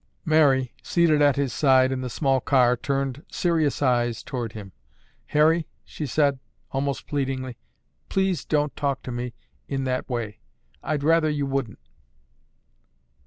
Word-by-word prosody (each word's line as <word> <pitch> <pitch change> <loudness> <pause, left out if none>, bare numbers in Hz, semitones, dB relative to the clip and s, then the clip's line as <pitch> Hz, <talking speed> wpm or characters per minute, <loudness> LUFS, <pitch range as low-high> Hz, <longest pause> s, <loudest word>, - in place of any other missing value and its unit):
Mary, 140 -6 +3
seated 165 -4 +2
at 145 -1 +5
his 140 -3 -1
side 130 -2 +4
in 130 -1 -2
the 130 - -4
small 135 +1 +1
car, 125 -2 +3
turned 135 +2 -2
serious 160 -5 +1
eyes 120 -3 +1
toward 120 -4 -4
him. 100 -3 -9 0.6
"Harry," 155 +2 +3 0.2
she 150 - -5
said 140 0 +2 0.3
almost 135 0 -2
pleadingly, 130 -4 -3 0.5
"please 190 -5 0
don't 150 -1 0
talk 140 -2 -2
to 125 - -6
me 120 0 -4 0.3
that 135 -2 -2
way. 115 -4 -4 0.4
I—I'd 150 -2 -2
rather 160 0 +4
you 145 -2 -1
wouldn't." 135 -5 -2
135 Hz, 135 wpm, -25 LUFS, 130-150 Hz, 0.6 s, at